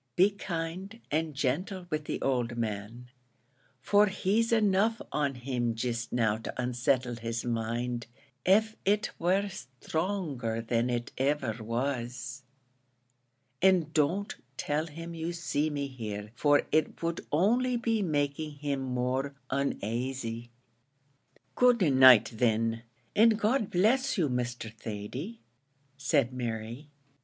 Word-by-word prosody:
Be 190 +3 +5
kind 185 +2 -5
and 155 0 0
gentle 175 +8 -1
with 155 -1 -2
the - - -3
owld 120 -3 0
man, 115 +2 -4 0.7
for 205 +7 +4
he's 205 +4 +1
enough 220 0 +3
on 140 -2 0
him 120 -2 -2
jist 115 0 -2
now 110 -3 +2
to 115 - -7
unsettle 125 0 0
his 115 0 -3
mind, 120 +1 -2 0.4
av 220 +3 +4
it 210 +2 +1
were 185 +4 +2
sthronger 155 - -3
than 120 +1 +1
it 120 -1 -2
iver 130 -5 0
was; 120 +2 -3 1.2
and 180 -5 +4
don't 170 +7 +1 0.2
tell 150 +2 -1
him 165 +2 -8
you 165 +1 -3
see 155 -3 -1
me 145 -1 -2
here, 105 -6 -6
for 145 +2 +3
it 155 +1 +1
would 165 0 -1
only 240 +10 +3
be 230 -2 0
making 150 -2 -1
him 145 -1 -3
more 130 +2 -1 0.2
onasy." 120 -2 -2 1.0
"Good 245 -2 +4
night, 130 -4 +8
thin, 115 -1 +1 0.3
an' 225 +2 +7
God 225 0 +1
bless 235 +9 +2
you, 160 -6 +2
Mr. 125 -3 -3
Thady," 115 - -6 0.5
said 135 -2 +1
Mary. 120 +3 -4
140 Hz, 120 wpm, -30 LUFS, 120-180 Hz, 1.2 s, night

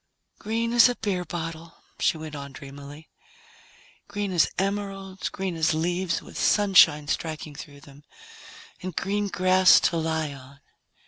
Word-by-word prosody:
"Green 230 +2 -2
as 240 +1 +7
a 245 - -2
beer 195 -6 -2
bottle," 165 -1 -6 0.2
she - - +2
went 155 -1 -8
on 140 -1 -8
dreamily, 140 +2 -11 1.0
"green 205 -1 -3
as 175 -3 +3
emeralds, 195 -1 -3
green 190 -2 -4
as 160 -1 +1
leaves 175 +2 -1
with - - -9
sunshine 180 -8 +5
striking 155 +1 -4
through 145 0 -11
them 140 +1 -16 0.8
and 185 -2 -6
green 205 +1 -1
grass 185 -1 +5
to 170 - +1
lie 160 -2 -2
on." 140 +1 -14
170 Hz, 140 wpm, -25 LUFS, 150-195 Hz, 1.0 s, as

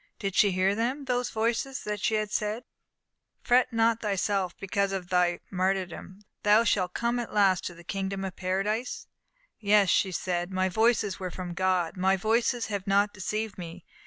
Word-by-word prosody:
Did 195 -2 -3
she 205 - +5
hear 185 +2 +2
them, 250 +6 -2
those 250 -1 0
voices 235 +4 -1
that 210 -1 -4
had 215 -2 0
said, 215 +3 -2 0.8
"Fret 250 +1 +3
not 230 0 +2
thyself 195 -2 -1
because 200 0 -1
of 185 -2 -4
thy 180 -1 +2
martyrdom; 185 +1 -2 0.2
thou 210 +2 +5
shalt 185 -5 0
come 235 +1 0
at 235 -2 -5
last 195 -3 +4
to 175 - -5
the 170 - -14
Kingdom 195 +1 -3
of 190 -1 -6
Paradise"? 195 +6 -2 0.5
"Yes," 205 -2 +4
she 190 - +2
said, 175 0 -2
"my 185 0 +1
voices 220 -1 +1
were 185 -1 -3
from 180 0 -6
God! 185 -1 0
My 190 +1 +2
voices 230 +3 +1
have 200 -1 -4
not 200 +1 +3
deceived 215 +2 -4
me!" 170 0 -8
200 Hz, 170 wpm, -28 LUFS, 185-220 Hz, 0.8 s, she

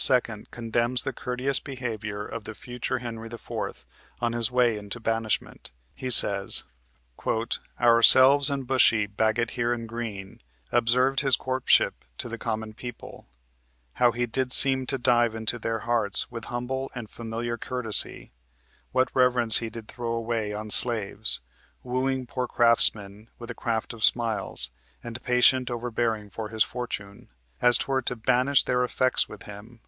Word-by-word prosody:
condemns 120 +1 0
the 135 - -3
courteous 125 +3 -1
behavior 110 -6 -5
of 115 -1 -7
the 110 - -7
future 125 +2 -4
Henry 115 -2 -7
IV. 115 - -6 0.3
on 120 -1 -1
his 120 0 0
way 125 -3 +2
into 105 +2 -6
banishment. 115 -1 -3 0.2
He 130 -1 -6
says: 100 -4 +3 1.2
"Ourselves, 130 +4 +7
and 140 -2 -3
Bushy, 120 -4 +3
Bagot 110 +3 -1
here 120 -1 -1
and 115 -1 -3
Green 110 -4 -7 0.3
Observed 125 +3 +2
his 135 -2 +3
courtship 130 0 +1 0.2
to - - -3
the 115 0 -7
common 110 -1 -4
people; 120 +1 -10 0.7
How 120 -1 +5
he 120 +1 -2
did 125 +2 -2
seem 130 -1 +4
to 135 - +2
dive 120 -2 +2
into 110 +2 -2
their 115 0 -3
hearts 120 0 0
With 115 -2 -7
humble 130 +2 -4
and 120 -3 -6
familiar 115 +1 -5
courtesy; 125 -4 0 0.6
What 130 0 +1
reverence 125 -3 +2
he 115 - -5
did 110 -1 -10
throw 120 -1 -5
away 115 -2 -2
on 105 0 -6
slaves; 110 -2 0 0.4
Wooing 130 +1 -2
poor 125 +1 -4
craftsmen 110 -3 +2
with 120 0 -10
the - - -4
craft 115 -2 -3
of 115 -1 -7
smiles 110 - +2 0.3
And 120 0 -6
patient 125 +1 +3
overbearing 115 -3 -3
of 110 -1 -5
his 110 0 +2
fortune, 100 -6 -7 0.3
As 120 -1 +7
'twere 135 -1 -1
to 125 - 0
banish 130 +4 +2
their 125 0 0
effects 130 +1 +1
with 105 - -11
him. 105 +3 -12
120 Hz, 150 wpm, -26 LUFS, 110-125 Hz, 1.2 s, Ourselves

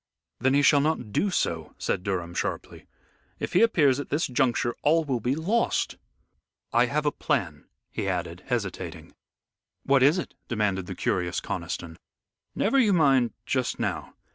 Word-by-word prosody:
"Then 130 +1 +2
he 145 - +4
shall 145 0 +6
not 140 -8 -1
do 200 - +2
so," 80 - -2
said - - -1
Durham, 90 -3 -3
sharply. - - -4 0.5
"If - - -4
he 180 - +5
appears 145 - +4
at 145 - -5
this 150 +3 +1
juncture 125 -2 +1
all 165 +2 +3
will 130 -4 -1
be 125 +4 0
lost. 200 +10 0 0.8
I 120 +1 +4
have 150 +4 -1
a 145 - +3
plan," 90 - -2 0.3
he - - -3
added, - - -4
hesitating. - - -4 0.7
"What 135 -1 +3
is 145 +7 +5
it?" 180 - -4
demanded 100 -5 -1
the 95 - -5
curious 90 0 -1
Conniston. 80 -1 -5 0.6
"Never 270 +7 +2
you 215 -6 +4
mind 135 - +3
just - - -1
now. - - -3
135 Hz, 160 wpm, -26 LUFS, 105-155 Hz, 0.8 s, shall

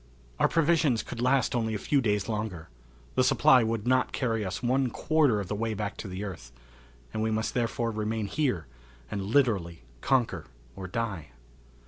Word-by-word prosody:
Our - - +5
provisions 155 -7 +2
could 120 - -6
last 130 0 +2
only 110 -2 0
a - - 0
few 140 +6 +1
days 105 -4 0
longer. 105 - -4 0.4
The 130 - +3
supply 130 0 +5
would 110 -1 -2
not 130 +1 +2
carry 115 -4 -1
us 95 +4 -4
one 130 +1 +2
quarter 145 -4 +2
of 100 - -4
the - - -3
way 110 +1 -2
back 105 0 -3
to - - -6
the 95 +2 -5
earth, 80 -12 -7 0.6
and - - -2
we 110 - +1
must 110 0 -1
therefore 120 -1 -1
remain 110 0 -2
here 125 - -1 0.5
and 100 - -2
literally 100 - +1 0.2
conquer 130 -4 +1 0.3
or 95 - -6
die. 95 -6 -3
110 Hz, 175 wpm, -28 LUFS, 100-125 Hz, 0.6 s, Our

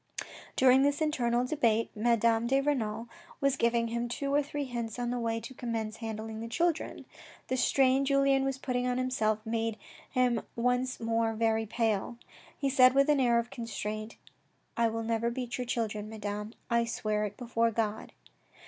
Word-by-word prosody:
During 260 0 +6
this 285 +1 +2
internal 245 -6 +1
debate, 230 -6 +1
Madame 230 +1 +2
de 270 +2 +3
Renal 235 -6 -1 0.3
was 275 -1 +2
giving 235 -2 +1
him 235 +1 -2
two 275 +3 -2
or 290 - +4
three 290 0 -4
hints 235 -4 -4
on 245 0 -2
the 245 - -1
way 230 -1 -1
to 260 - -9
commence 225 -3 -3
handling 220 -1 -5
the 230 - -5
children. 330 +6 -1 0.4
The 260 - +1
strain 260 +1 +3
Julien 275 -1 +3
was 270 -1 -1
putting 250 -2 -1
on 250 0 0
himself 220 -4 0
made 225 -1 -1 0.3
him 250 -3 +2
once 250 +2 0
more 225 0 0
very 225 0 +1
pale. 225 0 -1 0.4
He 280 - -1
said 255 -1 +6
with 275 +2 +4
an 295 -2 +4
air 240 -2 +4
of 235 +1 -1
constraint. 215 -2 -5 0.3
" - - -42
I 230 0 +3
will 225 0 -2
never 230 +1 0
beat 245 0 -4
your 250 - -2
children, 215 -3 -2
Madame. 210 0 -5
I 235 -1 +2
swear 215 -2 -1
it 205 0 -6
before 230 -1 +1
God." 220 -1 -2
235 Hz, 175 wpm, -30 LUFS, 225-255 Hz, 0.4 s, During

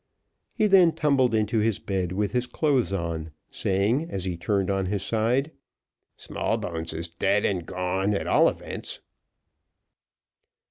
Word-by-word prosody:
He 215 - +2
then 185 -5 +6
tumbled 135 -6 +2
into 110 +1 +1
his 110 -1 +1
bed 95 -3 -2
with 100 +1 -1
his 125 +1 0
clothes 135 -3 +1
on, 85 -4 -3 0.2
saying, 110 - 0
as 95 -1 -3
he 90 -2 -2
turned 95 +3 0
on 95 -1 0
his 100 +1 -2
side, 120 +7 0 0.6
"Smallbones 80 -1 -3
is 80 +2 -3
dead 100 +5 +1
and 90 -4 -1
gone, 95 +3 -1
at - - -2
all - - +5
events." - - -6
100 Hz, 140 wpm, -26 LUFS, 90-120 Hz, 0.6 s, then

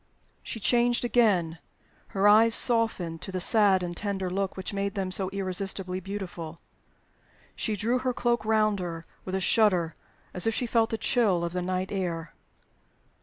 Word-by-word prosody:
She 225 - -5
changed 240 +2 +2
again; 190 -9 +2 0.5
her 195 +1 +1
eyes 225 +2 +7
softened 220 -9 +1
to - - -7
the 185 - -3
sad 195 -1 +4
and 175 0 -4
tender 190 -2 -3
look 195 0 -2
which 190 - -5
made 200 +1 -2
them 190 -2 -2
so 185 0 0
irresistibly 190 -1 -3
beautiful. 175 -4 -7 1.0
She 215 - -1
drew 230 +5 0
her 255 0 -1
cloak 240 -1 0
round 215 -2 +2
her 165 -2 -5 0.2
with 185 - -3
a - - 0
shudder, 185 -5 +2 0.4
as 180 +3 +2
if 225 - +1
she 250 - -1
felt 230 -1 +1
the 225 - -2
chill 210 -8 +2
of 170 - -5
the 180 - -2
night 185 +1 -2
air. 170 -5 -3
195 Hz, 170 wpm, -27 LUFS, 180-220 Hz, 1.0 s, eyes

